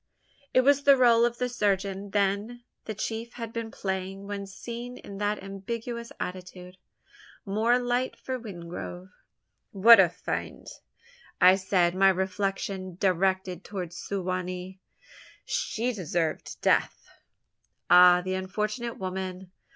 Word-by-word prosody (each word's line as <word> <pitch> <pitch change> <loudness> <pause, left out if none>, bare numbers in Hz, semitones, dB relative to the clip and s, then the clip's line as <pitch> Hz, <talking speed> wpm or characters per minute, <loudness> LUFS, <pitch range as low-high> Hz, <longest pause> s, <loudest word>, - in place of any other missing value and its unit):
It 255 - +5
was 280 +2 +4
the 280 -1 +6
role 235 -2 +5
of 240 0 -1
the 250 - 0
surgeon, 200 -4 -1
then, 205 +4 -1 0.2
the 220 - -5
chief 225 +3 -4
had 230 -2 -7
been 230 -1 -4
playing 190 -1 -4
when 200 -1 -5
seen 235 +5 -7
in 200 -1 -10
that 205 -1 -1
ambiguous 230 +4 -6
attitude! 180 0 -7 0.7
More 220 +5 +2
light 245 +1 -1
for 260 -1 -5
Wingrove! 180 -2 -8 0.6
"What 225 +4 +8
a - - +6
fiend!" - - -5 0.7
I 185 +1 +7
said, 185 -2 +1
my 195 +1 +5
reflection 190 0 -2
directed 190 0 0
towards 180 -4 -6
Su 190 +2 -4
wa 185 0 -1
nee. 185 +1 -7 0.7
"She 240 +3 -1
deserved 170 -5 -3
death!" - - +1 0.8
"Ah 180 0 +7
the 185 +1 -2
unfortunate 210 +5 -3
woman! 185 -1 -5
195 Hz, 130 wpm, -27 LUFS, 185-230 Hz, 0.8 s, What